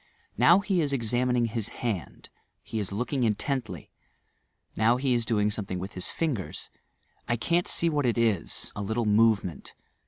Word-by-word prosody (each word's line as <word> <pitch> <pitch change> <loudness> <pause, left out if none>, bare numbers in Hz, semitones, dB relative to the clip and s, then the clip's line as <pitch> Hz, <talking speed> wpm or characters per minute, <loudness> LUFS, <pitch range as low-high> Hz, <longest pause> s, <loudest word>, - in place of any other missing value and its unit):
Now 150 - +6
fae 195 -2 0
is 145 -4 0
exam 125 0 +1
ining 120 -2 +1
bis 115 -2 -1
h&ndj 100 - -5 0.3
he 110 - -4
is 100 -2 -3
looking 125 +5 -1
intently: 110 - -2 0.8
now 115 +3 +3
be 130 0 +1
is 120 -1 +1
doing 105 -2 +1
something 100 -3 -4
with 95 +3 -6
his 90 - -3
fingers. 140 - -3 0.6
I 120 - +1
can't 170 +10 0
see 170 - +3
what 145 -5 +1
it 120 - +1
is, 110 -7 0
a 105 - -4
little 110 +3 -1
morement. 105 -7 +2
115 Hz, 165 wpm, -27 LUFS, 105-125 Hz, 0.8 s, Now